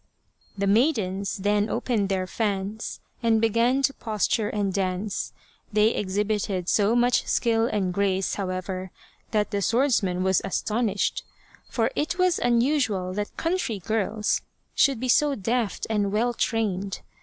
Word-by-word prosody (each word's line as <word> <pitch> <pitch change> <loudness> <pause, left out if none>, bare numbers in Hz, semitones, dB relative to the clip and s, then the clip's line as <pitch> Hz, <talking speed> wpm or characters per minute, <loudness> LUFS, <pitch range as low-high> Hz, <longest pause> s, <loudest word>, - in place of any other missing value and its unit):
The 200 - 0
maidens 200 -4 +1
then 205 +2 +1
opened 210 -5 0
their 190 -1 0
fans 205 +1 -3 0.2
and 225 -2 +3
began 230 +4 +2
to 275 - +2
posture 215 -1 -1
and 200 -2 -1
dance. 190 +1 -2 0.4
They 210 +1 +4
exhibited 200 -3 -1
so 210 +4 +3
much 245 +1 +2
skill 230 -1 +2
and 190 -5 -1
grace, 195 -1 0
however, 185 -1 -3 0.4
that 210 -2 0
the 200 - -1
swordsman 215 -6 +2
was 190 -1 +3
as 195 - -2
tonished, 215 -2 0 0.5
for - - 0
it 310 +4 -1
was 365 -2 +2
unusual 235 -6 +1
that 205 +1 -4
country 330 - -1
girls 215 +1 -1 0.3
should 275 -4 +3
be 255 - -2
so 285 +3 +3
deft 225 0 -1
and 205 -3 0
well 235 +4 +1
trained. 200 -5 -1
210 Hz, 140 wpm, -25 LUFS, 195-235 Hz, 0.5 s, They